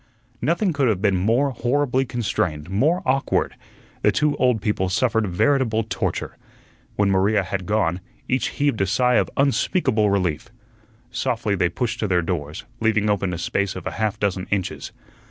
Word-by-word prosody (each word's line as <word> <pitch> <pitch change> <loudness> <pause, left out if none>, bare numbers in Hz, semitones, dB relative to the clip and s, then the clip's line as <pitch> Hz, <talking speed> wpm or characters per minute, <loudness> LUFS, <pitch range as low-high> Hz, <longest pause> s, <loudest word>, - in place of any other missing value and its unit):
Nothing 170 - +1
could 140 -3 +1
have 105 -5 +1
been 100 -1 +2
more 115 +10 +2
horribly 130 +1 0
constrained, 90 -9 -2
more 150 - +2
awkward. 135 +1 +1 0.5
The - - +4
two 150 -1 +1
old 125 -3 +2
people 95 -3 -1
suffered 115 +2 +1
veritable 115 +3 +1
torture. 110 - -3 0.6
When 100 -1 +2
Maria 100 +2 +2
had 95 -1 -4
gone, 95 -4 0 0.3
each 130 0 +1
heaved 140 -7 0
a 95 - +2
sigh 125 +4 +3
of - - +1
unspeakable 135 - +2
relief. 90 -3 -1 0.6
Softly 120 -4 -1
they 90 -3 +1
pushed 120 +5 -3
to 105 - 0
their 90 -2 +2
doors, 80 -4 -4
leaving 110 -2 +2
open 100 -2 0
a 85 - -3
space 95 +3 -1
of 95 - -7
half 110 -2 -1
a - - -29
dozen 95 -2 -1
inches. 100 -3 -2
105 Hz, 165 wpm, -22 LUFS, 95-125 Hz, 0.6 s, The